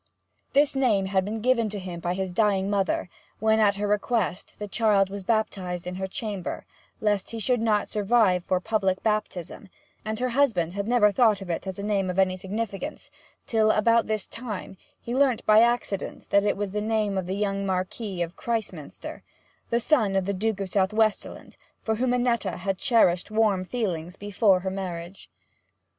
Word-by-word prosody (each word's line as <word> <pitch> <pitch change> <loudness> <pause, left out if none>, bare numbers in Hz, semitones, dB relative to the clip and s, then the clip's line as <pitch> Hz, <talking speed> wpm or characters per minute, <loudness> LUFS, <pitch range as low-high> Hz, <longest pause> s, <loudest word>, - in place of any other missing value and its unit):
This 285 0 +4
name 225 -8 +2
had 190 0 +1
been 215 +3 -4
given 235 -2 +2
him 185 -4 -6
by 175 +1 -2
his 190 -1 -3
dying 200 -1 +2
mother 195 -2 0 0.3
when, 220 +1 +2
at 205 -2 +4
her 205 +1 -2
request, 210 -1 -1
the 210 - -5
child 200 -2 +2
was 200 0 -5
baptized 190 -4 -1
in 180 - -4
her 190 - -1
chamber, 200 -3 -5 0.3
lest 205 -2 0
he 230 - -5
should 245 +2 +1
not 215 -2 +1
survive 210 -4 +2
for 185 0 0
public 190 -2 0
baptism; 210 -4 -2 0.3
and 215 +1 -3
her 255 0 0
husband 230 - +1
had 200 +1 -3
never 230 -4 +4
thought 220 -2 +3
of 190 -3 -5
it 170 - -4
as 190 - -4
a 200 - -5
name 200 -2 0
of 180 - -3
any 190 -1 +3
significance 205 +7 -5 0.3
till, 220 -3 +2
about 230 +2 +3
this 215 -1 -1
time, 220 -5 -7 0.2
he 235 - -6
learnt 265 -3 +2
by 215 +1 +7
accident 235 -4 -1
that 200 0 +4
it 205 - +1
was 205 -1 -3
the 210 +1 -2
name 215 -2 0
of 190 -2 -2
the 190 - -2
young 200 -1 -1
Marquis 190 0 -2
of 170 +1 -7
Christminster, 215 -10 -5 0.6
son 230 -6 +2
of 190 -1 +1
the 200 - -1
Duke 205 +1 -1
of 195 - -3
Southwesterland, 210 +3 0 0.3
for 220 -1 0
whom 250 +1 +1
Annetta 240 -6 0
had 190 +1 -2
cherished 185 -7 +3
warm 215 -4 +2
feelings 180 -6 -3
before 200 -2 +2
her 190 0 -3
marriage. 185 -1 -6
205 Hz, 180 wpm, -26 LUFS, 190-225 Hz, 0.6 s, by